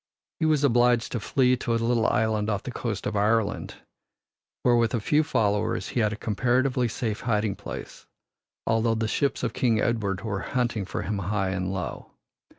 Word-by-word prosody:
He 160 - +2
was 150 -2 +2
obliged 120 -3 +3
to 120 - -1
flee 125 +2 +2
to 120 - -2
a - - +2
little 115 0 +2
island 110 0 +1
off 100 -2 -1
the 125 - -5
coast 115 -4 -4
of 105 - -2
Ireland, 105 +1 +1 0.9
where 120 -1 +4
with 120 0 +2
a - - 0
few 150 +8 +2
followers 110 -9 0
he - - -1
had 105 -2 +2
a - - -3
comparatively 125 +4 +1
safe 110 -1 -3
hiding 105 -4 0
place, 100 - -8 0.6
although 115 0 +2
the 110 0 -1
ships 140 +5 0
of - - -1
King 115 -3 +2
Edward 105 -5 0
were 105 -4 -3
hunting 120 -4 -1
for 95 - -4
him 100 0 -2
high 95 0 -1
and 95 -1 -2
low. 95 -2 -5
115 Hz, 185 wpm, -26 LUFS, 105-120 Hz, 0.9 s, where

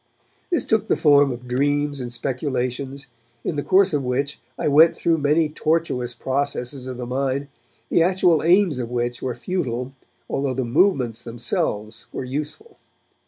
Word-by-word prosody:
This 340 -9 +1
took 220 -1 +1
the - - +3
form 145 -2 +5
of 125 0 -7
dreams 145 +2 0
and 120 -1 -5
speculations, 130 +1 -3 0.4
in 165 - -2
the 145 - -1
course 190 +2 +4
of 145 -2 +1
which 135 +3 -2 0.2
I - - -1
went 155 +3 +6
through 165 -1 +1
many 150 +3 +3
tortuous 150 -6 -1
processes 135 0 -2
of 130 -1 -5
the 125 - -5
mind, 135 +2 -2 0.4
the - - +3
actual 175 -2 +3
aims 175 -4 +3
of 120 -2 -3
which 120 0 -2
were 125 -2 -2
futile, 130 -8 -3 0.3
although 135 -2 -1
the 130 -1 -1
movements 125 - +2
themselves 115 -2 -3
were - - -4
useful. 150 - -5
140 Hz, 160 wpm, -22 LUFS, 125-155 Hz, 0.4 s, went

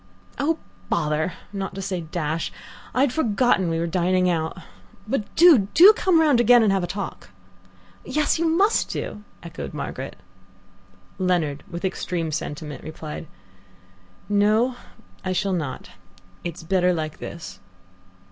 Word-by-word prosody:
"Oh, 315 +3 +1 0.3
bother, 155 +3 0 0.2
not 195 -1 -4
to 195 - -4
say 185 -2 -2
dash 160 0 -3 0.4
I 255 - +1
had 270 -3 +2
forgotten 235 - +2
we 165 - 0
were 165 - 0
dining 180 +1 +2
out; 160 +1 -2 0.5
but 220 -3 -3
do, 310 - +7
do, 380 +6 +10
come 370 -6 +3
round 295 -6 +4
again 240 0 +6
and 210 - +3
have 190 -2 +1
a - - -1
talk." 195 - -6 0.7
"Yes, 305 +1 0
you 335 - +2
must 390 +7 +2
do," 210 - -5 0.2
echoed 170 -1 -7
Margaret. - - -5 1.0
Leonard, 170 -6 0
with 170 +2 -5
extreme 175 -3 -2
sentiment, 145 -2 -5
replied: 155 0 -7 1.0
"No, 215 +5 +3 0.5
I 185 - -1
shall 190 +1 0
not. 145 - -4 0.5
It's 170 -1 -6
better 180 +1 +2
like 155 -2 -4
this." - - -8
185 Hz, 140 wpm, -23 LUFS, 165-240 Hz, 1.0 s, do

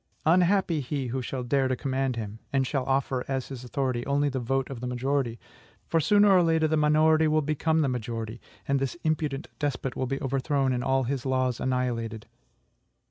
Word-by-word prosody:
Unhappy 180 0 +3
he 135 +1 -3
who 130 +2 -2
shall 125 0 -4
dare 135 +2 +1
to 130 - 0
command 130 0 -1
him, 110 -1 -6
and 135 -1 +2
shall 130 -1 -1
offer, 135 -1 0
as 135 -2 -3
his 130 -3 -7
authority, 125 -1 -2
only 145 +1 +2
the 130 -1 -2
vote 135 +2 -1
of 130 - -6
the 125 - -4
majority; 125 -1 -1 0.5
for, 165 - +1
sooner 205 +5 +5
or 185 -2 +6
later, 160 -2 +3
the 155 - +1
minority 155 +1 +4
will 155 0 +2
become 155 +2 +1
the 145 - +2
majority, 115 -2 -4 0.3
and 140 0 +2
this 135 +4 -2
imprudent 155 -2 -1
despot 135 -3 -2
will 130 - -2
be 135 +1 -2
overthrown, 135 0 0
and 125 0 -1
all 135 0 +2
his 130 0 -2
laws 130 -2 0
annihilated. 120 -4 -2
135 Hz, 190 wpm, -27 LUFS, 125-150 Hz, 0.5 s, or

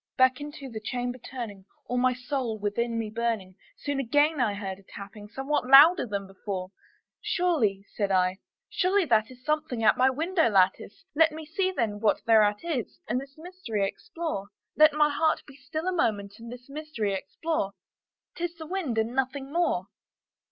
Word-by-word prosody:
Back 260 +1 +4
into 290 -2 -7
the 225 -4 -6
chamber 245 +3 -3
turning, 225 -7 -7 0.2
all 250 0 -1
my 255 0 +4
soul 250 -2 -3
within 230 +3 -1
me 220 -2 -3
burning, 220 -5 -2 0.2
Soon 285 -1 -2
again 290 +3 +2
I 210 -4 +1
heard 195 -2 -5
a - - -19
tapping 205 +1 -9
somewhat 270 +2 -1
louder 285 +4 +8
than 200 -2 -3
before. 190 -1 -6 0.5
"Surely," 230 - +1
said 200 -2 -1
I, 185 0 +2 0.3
"surely 380 +1 +2
that 220 -5 +3
is 255 0 -15
something 305 -6 -1
at 215 - +5
my 260 +1 +6
window 320 +2 +1
lattice; 195 - +1
Let 320 +1 +5
me 315 0 -8
see, 370 +5 0
then, 220 - -1
what 210 -1 +1
thereat 210 -2 +4
is, 310 -9 -3
and 245 +3 0
this 275 +1 -13
mystery 315 - -3
explore, 330 - -5 0.3
Let 305 0 +6
my 300 0 +4
heart 315 +2 +1
be 275 - -14
still 310 +5 -5
a - - +2
moment 205 - -1
and 230 +1 -9
this 245 0 -10
mystery 275 -8 -3
explore; 200 - -2 0.6
'Tis 345 0 -4
the 320 -1 -8
wind, 320 -9 -2
and 225 +2 0
nothing 270 +2 -2
more." 335 - +1
250 Hz, 175 wpm, -27 LUFS, 210-305 Hz, 0.6 s, louder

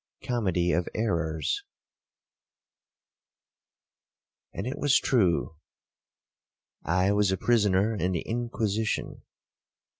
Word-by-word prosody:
COMEDY 95 -8 0
OF 90 0 0
ERRORS 85 -8 -1 2.9
'And 95 - -5
it 130 - -4
was 145 -2 +4
true,—I 90 - -3
was 105 -1 +2
a 95 - 0
prisoner 105 -2 +2
in 95 -2 -1
the 85 - -1
Inquisition. 110 -2 -2
100 Hz, 80 wpm, -27 LUFS, 90-115 Hz, 2.9 s, was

